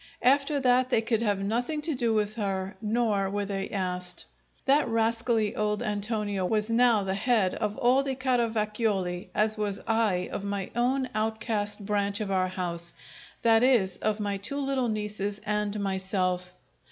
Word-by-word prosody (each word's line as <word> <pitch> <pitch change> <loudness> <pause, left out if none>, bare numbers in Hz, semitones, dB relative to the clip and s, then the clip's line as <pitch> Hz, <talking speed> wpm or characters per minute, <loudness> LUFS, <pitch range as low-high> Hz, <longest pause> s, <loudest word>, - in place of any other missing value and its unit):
After 280 +3 +3
that 255 0 +3
they 225 -3 +2
would 225 -1 +3
have 205 -3 0
nothing 245 +9 -1
to 320 - +1
do 240 -3 +1
with 215 -1 +1
her, 195 -3 -3
nor 215 -3 +1
were 205 +1 -2
they 195 -1 -3
asked. 180 -2 -2 0.4
That 285 +2 +4
rascally 225 -1 +1
old 210 0 0
Antonio 205 -1 -1
was 215 +3 0
now 230 -3 +4
the 190 0 -1
head 205 -2 +2
of 210 -1 -2
all 250 +3 +4
the 270 -1 -2
Caravacioli, 215 -7 0
as 215 0 +1
was 200 -2 -1
I 220 -5 +1
of - - -4
my 200 -2 -3
own 255 +2 +1
outcast 215 -1 -2
branch 205 -1 0
of 210 -2 -3
our 185 -1 +2
house 175 -2 -3 0.5
that 225 -1 +5
is, 240 -7 +3
of 215 0 -1
my 205 -1 -1
two 200 +8 -2
little 270 -3 0
nieces 210 -1 -2
and 210 0 -1
myself. 185 -2 -1
210 Hz, 165 wpm, -28 LUFS, 195-235 Hz, 0.5 s, that